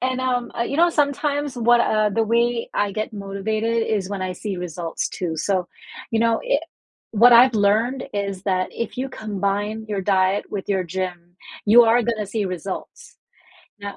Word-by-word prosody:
And, 255 0 -1
um, 250 -2 -1
uh, - - +2
you 275 - -3
know, 345 +2 +4
sometimes 290 -2 0
what, 240 0 +4
uh 215 -2 +2
the 225 +3 +1
way 235 +1 +1
I 205 -1 0
get 215 +2 -3
motivated 215 +3 -2
is 200 -4 -1
when 200 -2 -4
I 185 0 -2
see 195 +1 -5
results 170 -1 -4
too, 170 -3 -4
so, 185 +2 0 0.4
you 225 - +1
know, 230 0 +2
i - - +2 0.5
what 235 +3 +6
I've 245 +1 +7
learned 220 +5 +2
is 200 -2 -3
that 185 -2 0
if 230 - -5
you 265 +1 -2
combine 205 -1 -3
your 200 -2 -2
diet 190 +1 +2
with 200 -2 -5
your 190 -2 0
gym, 175 0 -5 0.3
you 230 +3 +8
are 230 +2 +4
gonna 220 -2 -2
see 205 +1 -2
results. 185 0 -6 0.6
Now 200 0 -6
215 Hz, 180 wpm, -22 LUFS, 195-235 Hz, 0.6 s, you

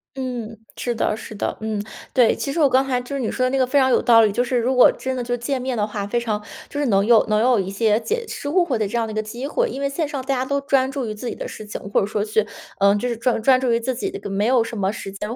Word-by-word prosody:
嗯， 245 -4 -5 0.2
是 240 -1 -2
的， 215 - 0
是 220 0 -9
的， - - -2
嗯， 220 -1 -2 0.3
对， 245 -4 +4
其 275 - -3
实 330 - -2
我 290 - +6
刚 265 0 +3
才 250 -2 +1
就 250 +3 -6
是 275 - -2
你 225 - -1
说 255 - -1
的 - - +2
那 270 - +1
个 260 -1 +2
非 285 - +1
常 260 -1 +4
有 - - +4
道 230 -2 +6
理。 215 - +3
就 240 +5 +1
是 250 0 -1
如 245 +2 +1
果 250 - +7
真 260 0 -4
的 250 - -3
就 245 0 -2
见 255 +2 -2
面 255 -1 -2
的 210 - +1
话， 205 -1 -4
非 240 +4 0
常 215 -3 -2 0.3
就 290 - -4
是 290 - +1
能 200 -2 +3
有 230 -1 +6
能 215 0 +3
有 240 -1 +3
一 190 - -2
些 210 +2 +2
解 460 - -2
释 285 - -5
误 355 +2 +3
会 255 -8 -1
的 215 - 0
这 235 - -2
样 230 - +1
的 220 - -6
一 - - -7
个 215 - +1
机 235 +5 -6
会。 - - 0
因 275 - -6
为 280 - 0
线 300 +3 -2
上 285 -1 -4
大 275 +1 -1
家 255 - 0
都 280 +2 -1
专 270 -2 +1
注 275 -2 -3
于 215 - -4
自 215 +4 -7
己 - - -5
的 - - -6
事 - - -8
情， 210 - -6
或 - - +3
者 195 - 0
说 210 -1 -1
去 215 0 +1 0.4
呃， 200 +1 +5
就 225 +4 -1
是 240 - -2
专 230 +1 0
专 260 +1 +5
注 250 -2 +1
于 230 - +2
自 255 +3 -2
己 380 +11 -3
的 400 - -7
没 200 +2 0
有 250 -2 +4
什 230 +1 -7
么 195 -2 0
时 195 -2 -7
间， 210 +4 -5
240 Hz, 360 characters per minute, -22 LUFS, 215-265 Hz, 0.4 s, 果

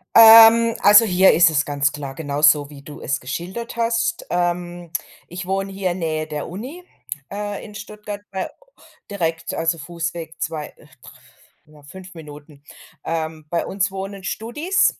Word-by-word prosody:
Ähm, 225 0 +9
also, 210 +2 +7
hier 190 -1 +5
ist 170 0 +5
es 150 -1 +1
ganz 145 0 0
klar, 140 -2 -7
genauso 145 -1 +2
wie 140 -2 -12
du 145 +1 -11
es 140 - -2
geschildert 185 - -6
hast. 230 +8 -1
Ähm, 175 -1 -2 0.4
ich 175 +1 -7
wohne 195 +1 -2
hier 190 -2 -2
Nähe 160 -3 -3
der 150 -1 -5
Uni, 255 - -8 0.5
äh, 205 0 -5
in 210 -1 -12
Stuttgart 210 -1 -8
bei 190 -1 -4 0.6
direkt, 165 -4 -3
also, 165 0 -1
Fußweg 165 +1 -6
2, 150 -2 -4
dr - - -21 0.9
ja, 145 - -18
5 185 +5 -12
Minuten. 150 -2 -13 0.4
Ähm, 160 -1 -4
bei 170 +1 -1
uns 195 -1 -1
wohnen 195 0 -7
Studis, 295 - 0
175 Hz, 150 wpm, -21 LUFS, 155-205 Hz, 0.9 s, Ähm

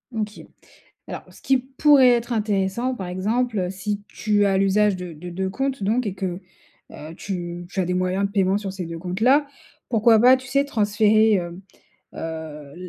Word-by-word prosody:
OK. 215 -1 -4 0.6
Alors, - - -7
ce - - -18
qui 265 -1 +3
pourrait 265 +1 +4
être 240 0 +1
intéressant 210 +3 0
par 190 -6 -6
exemple, 220 +6 -1
heu, 180 -1 -1
si 200 +2 -4
tu 205 -1 +1
as 195 -1 +2
l'usage 195 +1 +3
de 180 -1 -7
de 170 +3 -9
2 190 +2 -3
comptes 270 +3 -2
donc 225 +5 0
et 195 - -3
que, 185 -2 -4 0.5
heu 155 +2 -9
tu 175 -2 -5
tu 190 - -3
as - - +1
des 180 +1 -2
moyens 185 +2 0
de - - -8
paiement 195 -1 +2
sur 200 -2 -5
ces 185 -3 -5
2 165 0 -6
comptes 180 +3 -5
là, 275 +5 +4 0.4
pourquoi 225 -1 +4
pas, 250 +3 +7
tu 260 +1 -11
sais 275 +2 +1
transférer, 215 -3 +3
hem, 175 -1 -3 0.5
heu, - - -13
la 155 -3 -7
200 Hz, 195 wpm, -23 LUFS, 180-230 Hz, 0.6 s, pas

